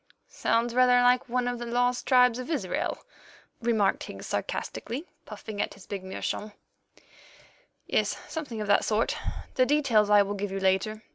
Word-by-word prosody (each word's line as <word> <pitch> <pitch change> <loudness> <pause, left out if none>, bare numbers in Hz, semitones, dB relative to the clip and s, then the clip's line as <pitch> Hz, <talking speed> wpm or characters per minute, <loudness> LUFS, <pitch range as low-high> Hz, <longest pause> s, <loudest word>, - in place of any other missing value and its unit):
"Sounds 230 +1 0
rather 250 0 +5
like 250 0 +3
one 250 0 0
of 245 -1 -2
the 240 - -5
lost 245 +1 0
tribes 250 -2 +5
of 255 - -6
Israel," 320 - -1 0.6
remarked 220 -4 +2
Higgs - - -8
sarcastically, 270 +8 -4 0.2
puffing 210 -1 -6
at - - -3
his 195 - -15
big 195 -2 -5
meerschaum. 205 +2 -4 1.3
"Yes, - - 0
something 280 -9 -5
of 210 - -3
that 205 - +4
sort. 220 +1 +1 0.4
The 255 - +3
details 250 -8 +3
I 205 -1 +6
will 200 +1 -4
give 205 -1 -4
you 195 - -3
later. 195 +3 0
230 Hz, 160 wpm, -27 LUFS, 205-250 Hz, 1.3 s, I